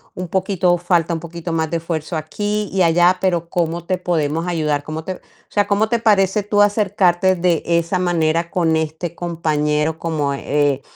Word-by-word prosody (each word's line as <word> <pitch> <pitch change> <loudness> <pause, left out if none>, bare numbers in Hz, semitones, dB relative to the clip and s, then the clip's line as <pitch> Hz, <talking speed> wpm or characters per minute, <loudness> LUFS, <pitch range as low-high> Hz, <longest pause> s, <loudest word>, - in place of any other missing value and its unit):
un 180 -1 -5
poquito 185 -1 +1
falta 175 -1 +1
un 165 - -2
poquito 170 0 -6
más 160 -1 0
de 170 - +1
esfuerzo 165 0 -4
aquí 205 +6 -3
y 190 - +1
allá, 175 +2 +4
pero 175 -3 0
¿cómo 170 0 -2
te 185 0 0
podemos 165 -1 -1
ayudar? 150 -4 -1
¿Cómo 155 +1 -6
te?". 185 - -3
O - - -24 0.3
sea, 205 -1 +1
¿cómo 210 +1 +2
te 235 - +1
parece, 205 -2 +2
tú 205 0 +2
acercarte 190 -3 +2
de 170 -2 +1
esa 170 +2 +1
manera 170 -1 0
con 165 -4 +1
este 160 +2 -3
compañero?, 155 -2 -1
como, 150 -4 -1
eh, 145 -1 0
170 Hz, 180 wpm, -19 LUFS, 160-185 Hz, 0.3 s, allá